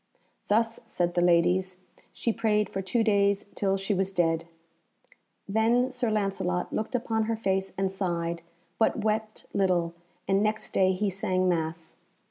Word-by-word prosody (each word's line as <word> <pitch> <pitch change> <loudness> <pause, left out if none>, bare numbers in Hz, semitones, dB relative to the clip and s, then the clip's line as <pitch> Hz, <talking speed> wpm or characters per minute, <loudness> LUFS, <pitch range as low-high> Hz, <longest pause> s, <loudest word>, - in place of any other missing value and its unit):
"Thus," 225 +2 +2
said 175 -6 -1
the 175 - +2
ladies, 180 +2 +3 0.3
"she 230 - -1
prayed 215 -2 +1
for 195 - -2
two 225 +5 +1
days 200 -2 +2
till 195 -1 0
she 195 +2 -1
was 190 0 0
dead." 165 -2 +1 1.0
Then 230 +5 +2
Sir 250 -2 0
Lancelot 195 -4 -1
looked 220 +4 -2
upon 225 -2 0
her 225 +1 0
face 195 -3 -1
and 195 0 0
sighed, 170 -3 -2 0.4
but 220 -1 +2
wept 215 0 -1
little, 180 -4 +1 0.3
and 195 +1 +3
next 215 +1 -1
day 190 0 +3
he 200 +2 0
sang 185 0 0
Mass. 165 -2 -2
195 Hz, 150 wpm, -28 LUFS, 180-220 Hz, 1.0 s, ladies